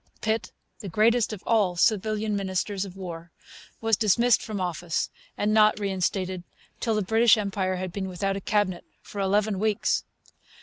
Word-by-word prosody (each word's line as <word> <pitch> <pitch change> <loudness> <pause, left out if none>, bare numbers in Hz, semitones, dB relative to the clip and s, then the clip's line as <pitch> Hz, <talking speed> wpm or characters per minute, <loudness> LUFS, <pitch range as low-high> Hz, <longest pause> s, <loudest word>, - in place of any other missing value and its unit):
Pitt, 220 0 -1 0.3
the 200 - -6
greatest 225 +4 +3
of 210 -3 -7
all 205 -6 +2
civilian 215 +2 +1
ministers 195 0 -2
of 190 -2 -10
War, 170 -3 -7 0.5
was 225 -1 +3
dismissed 230 +4 +3
from 215 -2 -5
office 175 -2 -2 0.3
and 210 +1 +1
not 215 -1 +5
reinstated 190 -2 -1 0.4
till 225 -2 0
the 210 - +1
British 225 +3 +5
Empire 195 -2 -1
had 185 0 -4
been 195 -2 -3
without 195 +2 -2
a 195 - -4
cabinet 195 -3 0 0.2
for 200 - -6
eleven 200 +1 +1
weeks. 215 0 +1
200 Hz, 160 wpm, -26 LUFS, 185-215 Hz, 0.5 s, not